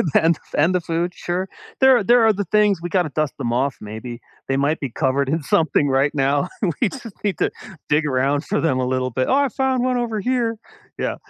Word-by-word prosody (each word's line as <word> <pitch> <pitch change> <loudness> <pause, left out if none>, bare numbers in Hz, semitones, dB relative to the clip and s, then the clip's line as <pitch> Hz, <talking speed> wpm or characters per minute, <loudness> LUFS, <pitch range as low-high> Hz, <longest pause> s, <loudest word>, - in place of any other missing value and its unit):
And 165 -1 +4 0.2
and 165 +5 +3
the 180 - +1
food, 170 +2 -2
sure. 180 +2 -3 0.3
There 265 -4 +5
there 240 +2 +5
are 220 - +5
the 205 0 -3
things 205 -2 +2
we 175 - -4
gotta 175 -2 +1
dust 155 0 -1
them 120 - -2
off 130 +3 0
maybe. 110 +3 -7 0.3
They 135 - 0
might 145 +3 +1
be 135 - -3
covered 135 +1 0
in 160 0 -1
something 145 0 +2
right 135 +2 +2
now. 140 +3 +1 0.3
We 235 - +3
just 235 -3 -9
need 195 -6 -1
to - - +1 0.4
dig 150 +1 +2
around 140 +2 0
for 210 - -1
them 130 -6 +1
a 125 - 0
little 130 0 -1
bit, 130 +2 -1
"Oh, - - +2
I 280 0 +3
found 260 0 0
one 255 -1 +1
over 230 -3 -2
here." 235 0 0 0.4
Yeah. - - -1
165 Hz, 225 wpm, -21 LUFS, 135-210 Hz, 0.4 s, There